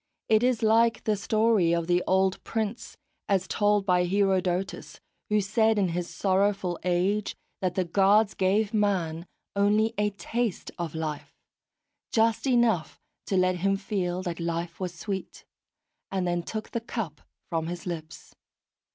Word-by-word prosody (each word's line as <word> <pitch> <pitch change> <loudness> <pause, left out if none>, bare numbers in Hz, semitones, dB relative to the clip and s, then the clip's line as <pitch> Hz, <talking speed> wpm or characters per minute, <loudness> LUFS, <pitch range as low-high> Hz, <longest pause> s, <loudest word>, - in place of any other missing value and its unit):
It 220 -1 +5
is 245 -2 +1
like 230 +2 +3
the 215 - +1
story 215 -4 +2
of 170 -1 -1
the 175 +1 +2
old 190 0 +2
prince, 225 +1 -4 0.3
as 190 -2 +1
told 205 -1 +2
by 180 -2 +3
Herodotus, 190 -1 0 0.3
who 210 0 +3
said 220 +2 +2
in 195 -3 +2
his 175 +1 -3
sorrowful 195 -2 0
age 185 +4 0 0.3
that 180 -2 -1
the 185 - +1
Gods 200 +4 +4
gave 200 +3 +1
man 180 -6 0 0.3
only 210 +3 +3
a 210 0 +2
taste 210 +2 -3
of 165 -2 -4
life, 155 -2 -5 0.8
just 225 +3 +2
enough 235 - +2 0.3
to 195 - +1
let 185 0 +2
him 195 +2 +1
feel 185 -3 -2
that 175 -2 -4
life 170 0 -3
was 185 -2 -3
sweet, 190 +2 -6 0.6
and 190 -2 -1
then 175 0 0
took 215 +5 -6
the 235 - -2
cup 215 -10 -5 0.3
from 165 -1 -1
his 175 0 -6
lips. 160 -3 -7
195 Hz, 150 wpm, -27 LUFS, 175-215 Hz, 0.8 s, It